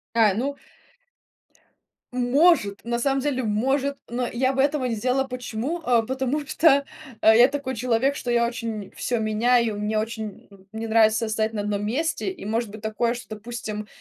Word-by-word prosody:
А, 220 -4 +5
ну 265 +7 -2 1.6
Может, 250 - +3
на 235 0 -1
самом 270 +2 +1
деле, 260 -2 -1
может, 270 +6 0
но 245 +1 -2
я 260 +2 +1
бы 265 - +2
этого 280 -1 +1
не 240 -2 -1
сделала. 255 +5 +1
Почему? 250 +5 -4
А 240 -4 +3
потому 265 +4 -2
что 285 -2 +4 0.4
я 220 +3 +7
такой 275 -2 -4
человек, 250 +4 +1
что 245 - -3
я 235 0 +3
очень 225 -4 -5
всё 240 -2 -1
меняю, 225 +1 +2
и - - -6
мне 210 +1 -1
очень, 220 -1 -4
ну, 195 -2 -18
не 220 +1 -5
нравится 220 0 +3
стоять 220 0 -1
на 210 - -2
одном 205 0 -2
месте. 315 - -1
И 370 - -10
может 225 +1 -1
быть 210 +1 -10
такое, 220 +2 0
что, 240 - -9
допустим, 215 -1 -6
235 Hz, 175 wpm, -24 LUFS, 220-265 Hz, 1.6 s, я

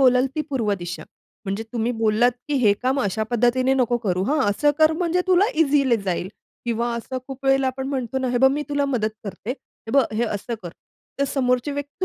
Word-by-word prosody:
बोलाल 255 0 +5
ती 310 - -1
पूर्व 230 -7 0
दिशा. 175 0 -6 0.4
म्हणजे 195 +2 -2
तुम्ही 235 0 0
बोललात 225 +2 +3 0.2
की 295 - 0
"हे 210 -3 +6
काम 260 +2 +1
अशा 205 -2 -1
पद्धतीने 245 +2 +2
नको 245 -2 +2
करू. 185 -5 -1
हां 295 +8 +1
असं 290 +9 +2
कर 315 0 +5
म्हणजे 345 +2 0
तुला 370 +1 +5
इझिली 280 -5 +3
जाईल" 190 -3 -2 0.4
किंवा 235 0 -1
असं 245 +3 -4
खूप 270 0 -9
वेळेला 270 0 +3
आपण 260 0 -3
म्हणतो 265 -2 -2
ना 260 -1 -1
"हे 245 - +1
बघ 265 +2 +6
मी 295 +1 -1
तुला 285 -1 +1
मदत 220 -2 0
करते. 205 +3 -6
हे 250 -3 -9
बघ 275 -1 +5
हे 235 - +2
असं 220 +1 -3
कर." 175 - -5 0.5
ते 280 - +2
समोरची 250 0 0
व्यक्ती 285 +5 -4
250 Hz, 210 wpm, -23 LUFS, 225-275 Hz, 0.5 s, हे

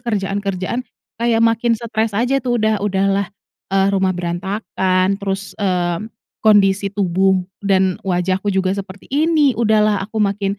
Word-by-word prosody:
kerjaan-kerjaan, 200 -1 -2 0.4
kaya 235 -1 +2
makin 230 +1 +2
setres 220 -2 -2
aja, 250 +4 +1
tuh. 245 -1 0
Udah 215 -2 +1
udahlah, 195 -1 0 0.4
eee, 195 0 +2
rumah 190 -2 +1
berantakan, 185 +1 -1
terus, 195 0 -4
eee, 180 0 -1 0.3
kondisi 200 -2 +4
tubuh 190 -1 +2 0.2
dan 190 +1 +1
wajahku 185 +1 0
juga 190 0 0
seperti 195 -1 -8
ini, 300 -1 +2
udahlah 215 -3 +2
aku 220 +3 -5
makin 200 -1 0
200 Hz, 130 wpm, -18 LUFS, 190-220 Hz, 0.4 s, kondisi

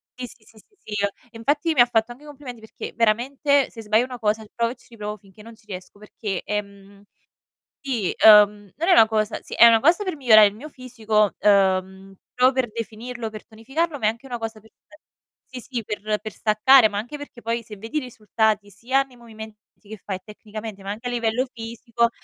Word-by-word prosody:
sì, 255 - -6
sì, 235 -1 -16
sì, 220 0 -21
sì, 415 - -22
sì, 210 -1 -5
ehm, 200 - +2 0.2
e - - -10
infatti 290 +8 0
mi - - -1
ha 240 - +8
fatto 230 -1 0
anche 260 +5 -20
i - - -14
complimenti, 275 -5 -10
perché 220 - -9
veramente 265 +5 +2
se 225 - -10
sbaglio 215 +3 +3
1 255 -1 -8
cosa, 215 0 0
riprovo 230 +2 -2
e - - -9
ci 245 - -24
riprovo 210 -2 -6
finché 195 +1 -19
non 230 +1 -13
ci 220 - -27
riesco, 185 0 -9
perché, 210 -2 -5
ehm, 200 -1 -6 0.8
i 240 -9 -2
uhm, 210 -2 +7
non 330 +3 -3
è - - +7
na 220 - +7
cosa 215 -1 -1
sì - - -10
è 235 - +8
una 230 -1 +6
cosa 335 - +3
per 370 -4 -3
migliorare 220 -7 +7
il 200 - -6
mio 265 +8 -10
fisico, 225 -6 -1
uhm, 190 -1 +1 0.2
pro 255 +1 +4
per 260 -3 -1
definirlo, 230 +1 -6
per 215 -1 -11
tonificarlo, 280 +8 -3
ma 220 - -2
è - - +5
anche 230 +4 -7
una 245 -3 -5
cosa 225 -1 -6
per 220 +1 -22 0.8
e 255 - -7
sì, - - -17
sì, 235 - -1
per 210 0 -3
per 215 0 -7
staccare, 220 +3 +5
ma 205 - -5
anche 240 +8 -5
perché, 285 -4 -11
poi 230 +1 -1
se 210 -2 -11
vedi 225 +8 -5
i - - +3
risultati, 220 -4 -1
sia 255 +7 0
nei 265 -2 -20
movimenti 220 -2 -11 0.2
che 220 +1 -10
fai 190 -2 -4
tecnicamente, 210 -1 -9
ma 195 - -7
anche 220 +4 -5
a - - -3
livello 235 +1 0
fisico, 235 +1 -2
225 Hz, 220 wpm, -23 LUFS, 210-250 Hz, 0.8 s, ha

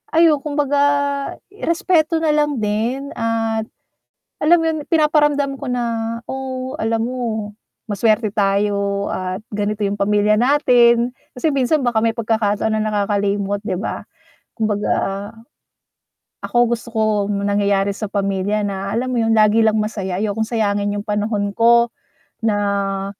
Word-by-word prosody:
ayun 325 -3 +5
kumbaga 290 -1 -1 0.9
respeto 330 -1 +1
nalang 300 -2 +2
din, 235 +7 -1
at 225 -1 -1 0.8
alam 340 +3 +5
'yun? 320 -1 0
Pinaparamdam 295 -3 +2
ko 275 -2 -6
na. 230 -2 -2
"Oh 260 -1 -5
alam 225 +1 0
mo 255 +1 -4 0.7
maswerte 215 +1 +1
tayo 200 0 0
at 185 +1 -4
ganito 205 0 -1
'yung 200 - -1
pamilya 210 +1 +2
natin," 245 -1 +4 0.2
kasi 300 +2 0
minsan 270 +1 +1
baka 225 -2 +1
may 225 -1 +1
pagkakataon 220 -1 0
na 215 - 0
nakakalimot, 205 -1 -1
'di 195 -4 -3
ba. 200 - -4 0.5
Kumbaga, 210 -2 -1 1.5
ako 240 - -3
gusto 235 0 -3
ko 220 - +2 0.3
'yung 200 -1 -2
nangyayari 200 -1 +1
sa 205 +1 -5
pamilya 200 +1 -1
na 195 +1 -3
alam 255 +2 -1
mo 245 - 0
'yun? 225 0 +2
Lagi 215 +1 +4
lang 220 -1 +3
masaya, 205 -4 -2
ayokong 220 +1 -1
sayangin 205 -3 0
yung 205 - -4
panahon 205 -1 -1
ko, 235 +2 +4 0.5
na 200 -2 0
220 Hz, 130 wpm, -19 LUFS, 205-250 Hz, 1.5 s, ayun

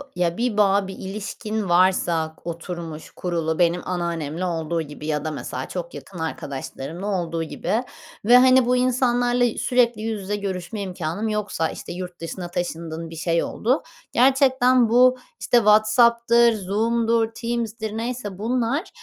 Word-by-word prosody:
ya, 175 -1 0
bir 235 -3 -1
bağ, 200 -1 +3
bir 190 - -6
ilişkin 210 +1 -4
varsa 175 -3 +2
k - - -25
oturmuş, 165 -2 -7
kurulu 165 -2 -2
benim 175 0 +3
anneannemle 170 -2 -2
olduğu 165 -1 -1
gibi 150 -1 -9
ya 150 -1 -1
da, 155 - -1
mesela, 150 - -5
çok - - -6
yakın 180 - -10
arkadaşlarımla 160 +3 -5
olduğu 170 -4 -1
gibi 220 +8 -2 0.4
ve, 245 +3 +8
hani, 255 0 +6
bu 250 +1 +2
insanlarla 245 -1 +2
i 240 -2 +1
sürekli 240 -3 +2
yüz 220 -2 -3
yüze 205 +2 -2
görüşme 200 +1 -4
imkânım 185 +2 -3
yoksa, 205 -6 -1
işte, - - -7
yurt 180 0 -7
dışına 175 +2 -5
taşındın, 165 -2 -4
bir 165 - -9
şey 165 +1 0
oldu. 255 +6 0 0.3
Gerçekten 255 -2 +4
bu, 250 +2 +5 0.2
işte, 245 - +2
WhatsApp'tır, 235 +2 +5
Zoom'dur, 225 +3 +1
Teams'dir 230 -2 -3
neyse 230 -5 -4
bunlar, 245 - -1
205 Hz, 150 wpm, -23 LUFS, 170-235 Hz, 0.4 s, ve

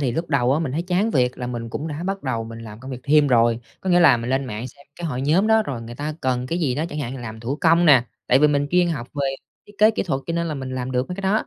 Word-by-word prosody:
thì 130 -4 0
lúc 165 +4 -3
đầu 130 -3 +2
á, 150 - +2
mình 140 -6 -2
thấy 165 - -1
chán 185 +5 0
việc 125 -5 +1
là 125 - -4
mình 120 -2 -5
cũng 150 +7 -4
đã 150 +2 -5
bắt 195 +1 -3
đầu 115 -4 -2
mình 115 0 -9
làm 110 -1 -10
công 130 +1 -9
việc 125 - -6
thêm 150 0 +4
rồi. 120 -2 +3 0.2
Có 190 - -2
nghĩa 175 - +5
là 165 -8 +7
mình 115 +2 -4
lên 135 +1 +1
mạng 120 +1 -5
xem 140 +3 -19
cái 175 - -4
hội 130 -4 -3
nhóm 170 +9 +3
đó, 220 0 +4
rồi 130 - -5
người 115 +1 -8
ta 150 +4 -4
cần 125 -1 -1
cái 170 +6 -2
gì 135 -7 0
đó, 155 +3 -1
chẳng 150 - -6
hạn 135 -1 -4
làm 110 -2 -7
thủ 130 +5 -3
công 170 +1 +4
nè, 130 -5 +6 0.2
tại 130 - +5
vì 150 - +5
mình 145 0 +1
chuyên 180 0 +3
học 140 -8 -3
về 140 -2 -1 0.3
thiết 205 - -16
kế 215 +1 +6
kỹ 220 - -2
thuật 140 -8 -2
cho 165 - -2
nên 170 0 -1
là 155 - -3
mình 130 -1 -5
làm 130 0 -4
được 125 +4 -1
mấy 180 - -4
cái 195 - -6
đó. 200 +3 +1
140 Hz, 330 wpm, -22 LUFS, 125-165 Hz, 0.3 s, là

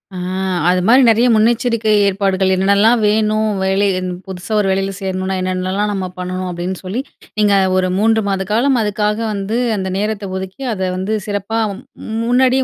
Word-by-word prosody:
ஆ - - -5 0.5
அது 185 - +3
மாரி 255 +3 +6
நெறைய 230 +3 +4
முன்னெச்சரிக்கை 230 0 +2 0.2
ஏற்பாடுகள் 190 -1 +1
என்னல்லாம் 200 +5 +3
வேணும், 215 +1 +2
வேலை 195 +1 +2
இந் 185 0 -4 0.2
புதுசா 185 +2 -8
ஒரு 200 - +1
வேலைல 195 +1 0
சேரணும்னா 190 0 -2
என்னென்னல்லாம் 185 +3 -1
நம்ம 190 -2 -3
பண்ணனும் 185 0 -4
அப்டின்னு 175 +1 -4
சொல்லி, 200 +8 -3 0.4
நீங்க 205 -1 +3 0.2
ஒரு 185 0 +1
3 220 0 +2
மாத 195 -1 -1
காலம் 250 +3 +2
அதுக்காக 210 0 0 0.2
வந்து 200 +3 -2 0.2
அந்த 190 -1 -3
நேரத்த 205 -2 -3
ஒதுக்கி, 190 +7 -7
அத 190 - -6 0.2
வந்து 195 +4 -1
சிறப்பா 205 +2 -2
மு - - -10 0.5
முன்னாடியே 260 +1 +3
200 Hz, 160 wpm, -17 LUFS, 190-220 Hz, 0.5 s, மாரி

